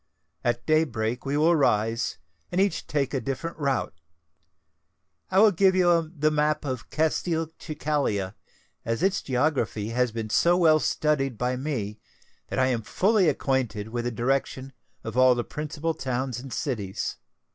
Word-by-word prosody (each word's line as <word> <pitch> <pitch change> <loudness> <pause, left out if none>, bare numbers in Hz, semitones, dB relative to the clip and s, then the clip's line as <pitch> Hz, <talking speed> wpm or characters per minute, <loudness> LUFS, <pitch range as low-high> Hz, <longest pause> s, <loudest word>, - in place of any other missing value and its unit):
At 120 0 -1
day 155 0 +4
break 115 -2 -3
we 140 +2 0
will 165 +3 +4
rise, 115 -5 +1 0.3
and 180 - 0
each 195 0 +1
take 140 -2 -1
a 135 - 0
different 140 +5 -4
route. 140 -4 0 1.4
I 190 - 0
will 215 +1 +7
give 190 0 +3
you 170 -3 +3
the 155 +1 +2
map 150 0 +1
of 130 -4 -4
Castelcicala, 155 - -1 0.5
as 115 +8 -2
its 195 0 +2
geography 125 -6 0
has 125 +1 +1
been 110 -1 -5
so 175 +8 +4
well 160 -3 +5
studied 135 -6 0
by 125 +2 0
me 125 -7 -3 0.5
that - - -4
I 130 - +4
am 125 -3 0
fully 190 - +2
acquainted 125 -7 -1
with 120 +1 -3
the 120 - -1
direction 130 +3 -1 0.3
of 110 +2 -5
all 130 -1 +6
the 120 - -1
principal 155 +3 -3
towns 130 -3 -3
and 130 +1 -9
cities. 110 - -3
135 Hz, 155 wpm, -26 LUFS, 120-155 Hz, 1.4 s, will